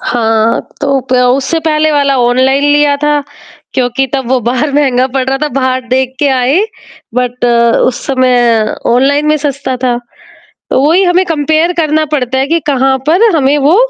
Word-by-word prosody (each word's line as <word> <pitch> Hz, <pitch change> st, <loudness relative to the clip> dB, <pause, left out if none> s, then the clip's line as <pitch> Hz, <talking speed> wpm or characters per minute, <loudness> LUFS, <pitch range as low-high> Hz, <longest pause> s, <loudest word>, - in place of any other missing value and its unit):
हाँ, 225 Hz, -1 st, 0 dB, 0.2 s
तो 275 Hz, -1 st, 0 dB
प 260 Hz, -, -20 dB
तो 250 Hz, 0 st, +3 dB
उससे 275 Hz, +5 st, -2 dB
पहले 310 Hz, 0 st, +1 dB
वाला 280 Hz, -2 st, +1 dB
ऑनलाइन 260 Hz, +3 st, +2 dB
लिया 290 Hz, -1 st, +2 dB
था, 295 Hz, -, +2 dB, 0.6 s
क्योंकि 255 Hz, +1 st, 0 dB
तब 265 Hz, -3 st, -3 dB
वो 260 Hz, 0 st, +2 dB
बाहर 275 Hz, +4 st, -1 dB
महँगा 260 Hz, -3 st, +2 dB
पड़ 260 Hz, -1 st, 0 dB
रहा 270 Hz, 0 st, -1 dB
था। 300 Hz, -, 0 dB
बाहर 260 Hz, -1 st, -1 dB
देख 260 Hz, 0 st, -1 dB
के 285 Hz, 0 st, +1 dB
आए, 270 Hz, +9 st, +2 dB, 0.5 s
बट 250 Hz, 0 st, -2 dB, 0.4 s
उस 245 Hz, -, -5 dB
समय 245 Hz, -4 st, +1 dB, 0.2 s
ऑनलाइन 285 Hz, +4 st, +2 dB
में 305 Hz, -, +2 dB
सस्ता 275 Hz, -2 st, -2 dB
था। 245 Hz, -1 st, +1 dB, 0.7 s
तो -, -, +2 dB
वही 355 Hz, +4 st, +3 dB
हमें 360 Hz, +1 st, +2 dB
कंपेयर 315 Hz, +1 st, 0 dB
करना 310 Hz, 0 st, +1 dB
पड़ता 265 Hz, -2 st, -1 dB
है 270 Hz, -, 0 dB
कि 330 Hz, +2 st, 0 dB
कहाँ 270 Hz, -2 st, +1 dB
पर 380 Hz, +4 st, +3 dB
हमें 285 Hz, 0 st, +2 dB
वो, 290 Hz, +6 st, +3 dB
270 Hz, 175 wpm, -11 LUFS, 255-295 Hz, 0.7 s, तो